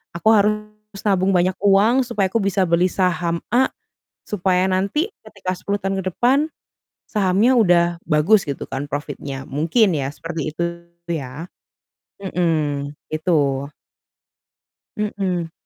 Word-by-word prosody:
aku 175 +6 +2
harus 210 0 -1
nabung 190 -2 +2
banyak 185 +1 +2
uang 205 +6 +4
supaya 210 -6 0
aku 230 - +1
bisa 195 -1 +1
beli 170 +2 +3
saham 170 -2 0
A 260 +2 +4 0.6
supaya 185 -2 +1
nanti 200 - 0 0.2
ketika 185 - -5
10 200 +2 -2
tahun 195 0 -1
ke 185 0 -3
depan 270 +5 +3 0.6
sahamnya 205 +3 +3
udah 175 -6 +5 0.2
bagus 160 +7 +4
gitu 140 - -3
kan 145 +2 -4
profitnya. 145 -2 -5
Mungkin 170 - +2
ya 135 -2 -1
seperti 160 -1 -4
itu 170 - -3 0.5
ya. 145 -2 -4 0.8
Mhm, 155 -7 -1 0.2
itu. 145 -4 +1 1.3
Mhm. 190 -5 -2
185 Hz, 125 wpm, -21 LUFS, 160-205 Hz, 1.3 s, udah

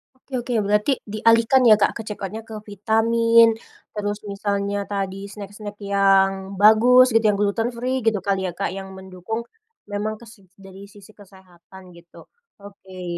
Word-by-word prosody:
Oke 260 - -34
oke. 245 0 -5
Berarti 210 +6 +1 0.2
dialihkan 230 +4 +3
ya, 215 - +8
Kak, - - +3
ke 230 - -6
checkout-nya 210 +1 -6
ke 220 - -9
vitamin, 230 +3 +3 0.5
terus 205 0 -3
misalnya 200 0 -2
tadi 195 -1 -3
snack-snack 205 0 -9 0.2
yang 195 -1 +4 0.3
bagus 240 +4 +6
gitu 225 - +4
yang 205 -1 +2
gluten 210 +3 0
free 255 +2 -2
gitu 220 -2 +2
kan 200 -1 0
ya, 185 -2 -3
Kak, - - -2
yang 195 0 -7
mendukung, 190 +4 -6 0.5
memang 205 +1 -3
kes 230 -2 -14 0.3
dari 195 0 -13
sisi 205 +1 -16
kesehatan 190 -2 -17
gitu, 170 0 -18 0.5
oke. 190 -2 -12
205 Hz, 150 wpm, -22 LUFS, 195-225 Hz, 0.5 s, ya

